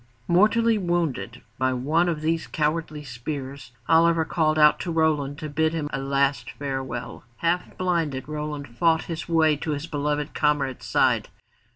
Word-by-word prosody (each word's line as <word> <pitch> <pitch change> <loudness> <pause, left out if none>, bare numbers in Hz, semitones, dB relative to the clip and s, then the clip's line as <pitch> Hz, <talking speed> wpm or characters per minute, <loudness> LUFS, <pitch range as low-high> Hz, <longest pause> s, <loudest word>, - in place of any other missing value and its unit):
Mortally 215 +5 +4
wounded 170 - -2 0.2
by 130 0 +2
one 155 +8 +1
of 155 -3 -2
these 160 +1 -1
cowardly 155 0 -2
spears, 135 0 -6 0.2
Oliver 165 0 +4
called 155 -2 +1
out 150 -1 +6
to 175 - -3
Roland 150 -3 +1
to 155 - -5
bid 160 +2 0
him 150 -3 -3
a 135 - -1
last 140 0 0
farewell. 135 -3 -5
Half 170 +1 -1
blinded, 165 -8 -1
Roland 150 -1 -4
fought 165 +2 +3
his 165 0 -6
way 160 -2 +4
to 155 +1 -3
his 145 +2 -4
beloved 150 -1 -2
comrade's 145 -4 0
side. - - +2
150 Hz, 155 wpm, -25 LUFS, 140-165 Hz, 0.2 s, out